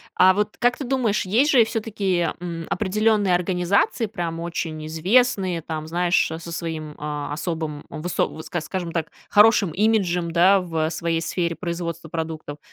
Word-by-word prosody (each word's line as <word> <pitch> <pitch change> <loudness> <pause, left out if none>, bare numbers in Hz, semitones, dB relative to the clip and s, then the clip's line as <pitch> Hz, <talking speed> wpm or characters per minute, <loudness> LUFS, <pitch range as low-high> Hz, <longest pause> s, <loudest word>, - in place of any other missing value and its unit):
а 185 +1 +6
вот 210 +1 -1
как 245 0 +2
ты 275 - -5
думаешь, 240 -6 0
есть 240 - +3
же 240 -5 +6
всё-таки, 200 -6 -1
м, 170 -2 -5
определенные 205 -1 +2
организации, 185 +6 +1
прям 175 -6 -4
очень 165 -2 -4
известные, 185 +1 +2
там, 155 -1 -5
знаешь, 175 +1 +1
а, 160 - -5
со 170 0 -8
своим, 160 -3 -5
а, 145 -1 -4
особым, 160 -2 -4
высо 170 +3 -1
ск 175 0 -3
скажем 175 0 -4
так, 165 -2 -2 0.2
хорошим 210 -4 +5
имиджем, 180 -4 +1
да, 185 +3 +5
в, 170 -2 -9
э, - - -2
своей 165 0 -1
сфере 170 0 -2
производства 170 -1 -4
продуктов. 160 -2 -5
175 Hz, 160 wpm, -23 LUFS, 165-200 Hz, 0.2 s, а